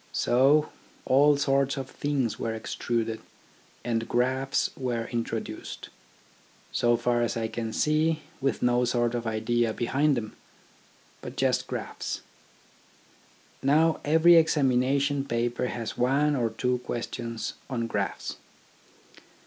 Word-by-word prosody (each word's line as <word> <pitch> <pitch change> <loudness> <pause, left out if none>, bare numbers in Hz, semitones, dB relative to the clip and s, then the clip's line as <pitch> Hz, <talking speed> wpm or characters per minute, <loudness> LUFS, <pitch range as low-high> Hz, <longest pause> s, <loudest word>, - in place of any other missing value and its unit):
So 140 +5 +3 0.3
all 145 +2 +5
sorts 140 0 +1
of 135 -1 -4
things 135 -5 -2
were 115 -1 -2
extruded, 115 0 -2 0.6
and 115 -1 -1
graphs 130 +3 +1
were 120 -3 -2
introduced. 115 -1 -5 0.8
So 120 0 +2
far 120 0 +1
as 120 -1 -1
I 115 -1 -1
can 110 0 -4
see, 155 +4 +1 0.2
with 135 -3 0
no 125 0 +3
sort 120 -1 +1
of 120 -1 -3
idea 110 +1 0
behind 140 +5 +1
them, 110 -2 -5 0.9
but - - -8
just - - +1
graphs. - - -5 1.4
Now 155 +4 +3
every 160 +3 +6
examination 140 -2 +2
paper 120 0 -1
has 115 -2 -5
one 140 +4 +2
or 120 -4 +1
two 125 +3 -1
questions 115 -1 -4 0.2
on 120 -3 -2
graphs. 100 -4 -3
125 Hz, 115 wpm, -27 LUFS, 115-140 Hz, 1.4 s, every